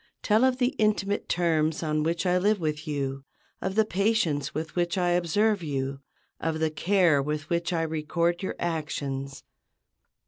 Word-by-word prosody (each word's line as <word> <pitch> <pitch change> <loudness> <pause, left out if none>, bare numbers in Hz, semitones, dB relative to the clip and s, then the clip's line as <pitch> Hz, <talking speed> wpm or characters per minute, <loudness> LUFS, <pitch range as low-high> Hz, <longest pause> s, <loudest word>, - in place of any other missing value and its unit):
Tell 215 +3 +3
of 260 -1 +3
the 250 -1 +2
intimate 210 -1 +1
terms 160 -2 +1
on 155 -1 0
which 165 +4 -1
I 180 0 +3
live 205 +2 +2
with 155 0 -3
you, 135 -2 -3 0.4
of 190 0 -2
the 220 0 +4
patience 195 -9 +1
with 160 +1 -5
which 175 +1 0
I 180 -1 +2
observe 180 +4 +2
you, 135 -3 -3 0.4
of 160 0 -1
the 160 -1 +1
care 170 -2 +3
with 150 +2 -4
which 170 +1 0
I 165 -2 0
record 170 +2 -1
your 190 - -3
actions. 140 -5 -3
165 Hz, 165 wpm, -27 LUFS, 150-190 Hz, 0.4 s, the